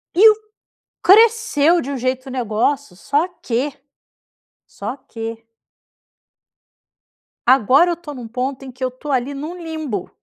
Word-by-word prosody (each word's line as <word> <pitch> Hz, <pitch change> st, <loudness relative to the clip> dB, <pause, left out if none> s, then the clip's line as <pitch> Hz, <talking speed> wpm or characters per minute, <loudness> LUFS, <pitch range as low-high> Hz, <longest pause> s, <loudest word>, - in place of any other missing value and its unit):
E 435 Hz, +5 st, +9 dB
o 430 Hz, -, +4 dB, 0.7 s
cresceu 415 Hz, -6 st, +5 dB
de 280 Hz, -, -5 dB
um 275 Hz, -, -3 dB
jeito 255 Hz, +1 st, -2 dB
o -, -, -6 dB
negócio 240 Hz, -1 st, -1 dB
só 290 Hz, -, 0 dB, 0.2 s
que, 255 Hz, +5 st, -1 dB, 1.0 s
só -, -, -6 dB
que 225 Hz, -3 st, -7 dB, 2.1 s
agora 265 Hz, -, +5 dB
eu 340 Hz, -, -1 dB
tô 310 Hz, -3 st, -9 dB
num 245 Hz, -4 st, -8 dB
ponto 255 Hz, +3 st, -3 dB
em 265 Hz, -, -8 dB
que 255 Hz, +1 st, -8 dB
eu -, -, +2 dB
estou 255 Hz, +4 st, -7 dB
ali 260 Hz, +2 st, 0 dB
num 310 Hz, +6 st, -6 dB
limbo. 315 Hz, -, -4 dB
275 Hz, 140 wpm, -20 LUFS, 250-315 Hz, 2.1 s, E